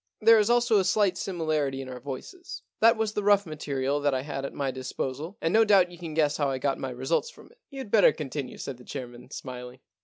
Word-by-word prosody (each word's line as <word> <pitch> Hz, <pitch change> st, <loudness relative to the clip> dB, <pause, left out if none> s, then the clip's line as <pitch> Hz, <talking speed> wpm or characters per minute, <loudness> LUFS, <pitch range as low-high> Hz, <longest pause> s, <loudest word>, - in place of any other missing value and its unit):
There 225 Hz, +1 st, +7 dB
is 210 Hz, +1 st, +2 dB
also 240 Hz, -3 st, +4 dB
a -, -, +2 dB
slight 195 Hz, 0 st, +2 dB
similarity 155 Hz, -7 st, -1 dB
in 135 Hz, -, -6 dB
our 125 Hz, -1 st, -7 dB
voices. 350 Hz, -, -8 dB, 0.2 s
That 230 Hz, +1 st, +5 dB
was 220 Hz, -1 st, -1 dB
the 210 Hz, -, -1 dB
rough 200 Hz, 0 st, +4 dB
material 145 Hz, -3 st, -2 dB
that 145 Hz, -2 st, +1 dB
I 130 Hz, -, -2 dB
had 140 Hz, -2 st, -4 dB
at -, -, -5 dB
my 140 Hz, -2 st, -2 dB
dis 130 Hz, 0 st, -6 dB
posal, 145 Hz, +8 st, -4 dB
and 165 Hz, -, +1 dB
no 225 Hz, +1 st, +6 dB
doubt 195 Hz, -4 st, +4 dB
you 175 Hz, -, -13 dB
can 165 Hz, -3 st, -6 dB
guess 150 Hz, -2 st, +2 dB
how 145 Hz, -2 st, +1 dB
I 135 Hz, -, -1 dB
got 135 Hz, +1 st, -1 dB
my 135 Hz, -, -3 dB
results 130 Hz, -, -1 dB
from -, -, -16 dB
it.' 480 Hz, -, -25 dB
* -, -, -64 dB
You'd 265 Hz, -7 st, -8 dB
better 210 Hz, -3 st, +6 dB
continue,' 145 Hz, -2 st, -5 dB
said 135 Hz, -, -6 dB
the 125 Hz, -, -15 dB
chairman, 125 Hz, -1 st, -8 dB
smiling. 125 Hz, -2 st, -8 dB
155 Hz, 250 wpm, -27 LUFS, 135-205 Hz, 0.2 s, There